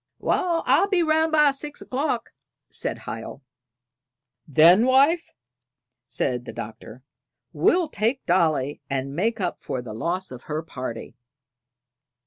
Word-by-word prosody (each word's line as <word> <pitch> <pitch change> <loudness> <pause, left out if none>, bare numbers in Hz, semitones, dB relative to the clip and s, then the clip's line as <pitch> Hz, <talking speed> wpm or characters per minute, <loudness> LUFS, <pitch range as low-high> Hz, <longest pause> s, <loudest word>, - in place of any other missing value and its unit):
"Wal, 340 -2 0
I'll 360 +8 +4
be 375 -4 +2
round 315 0 +2
by 300 -2 +5
six 290 +2 -7
o'clock," 260 -2 -2 0.4
said - - -3
Hiel. 115 +4 -7 1.0
"Then, 170 - +6
wife," 280 +6 +4 0.8
said 125 -2 -2
the - - -6
Doctor, 110 +3 -9 0.5
"we'll 355 -2 +3
take 235 0 -1
Dolly, 150 -5 +1
and 135 0 -3
make 220 +7 0
up 180 -3 -3
for 130 - -4
the 120 -3 -7
loss 175 - -3
of 125 -1 -10
her 155 +1 -3
party." 125 -7 -7
185 Hz, 125 wpm, -24 LUFS, -, 1.0 s, Then